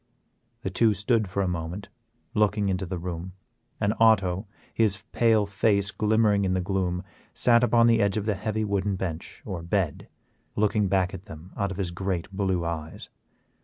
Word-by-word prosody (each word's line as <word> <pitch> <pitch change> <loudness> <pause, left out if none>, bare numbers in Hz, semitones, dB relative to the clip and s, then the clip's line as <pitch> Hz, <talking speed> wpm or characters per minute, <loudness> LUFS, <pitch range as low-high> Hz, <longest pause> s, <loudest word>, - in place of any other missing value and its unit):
The 95 - -2
two 110 +3 +3
stood 105 +1 +1
for 100 +2 -1
a - - 0
moment 90 +3 -4 0.4
looking 105 -1 +2
into 95 0 -1
the 90 +1 -3
room, 90 +1 -5 0.5
and 100 +1 +1
Otto, 100 -4 +3 0.3
his 105 -3 +1
pale 115 -3 +3
face 100 0 +1
glimmering 105 -1 +2
in 95 -1 +1
the - - +1
gloom, 90 -1 -1 0.3
sat 120 -1 +4
upon 115 0 +4
the 115 -1 +4
edge 100 0 +1
of 105 - -2
the 105 - +1
heavy 110 +2 -2
wooden 100 -1 0
bench 85 -3 -5
or 95 -5 -4
bed, 85 -2 -1 0.5
looking 105 -1 +2
back 95 0 +1
at 95 0 -8
them 80 +3 -11
out 100 -1 -1
of 95 - -6
his 95 -3 -2
great 95 0 -3
blue 95 -3 -1
eyes. 80 -1 -5
100 Hz, 175 wpm, -26 LUFS, 90-105 Hz, 0.5 s, sat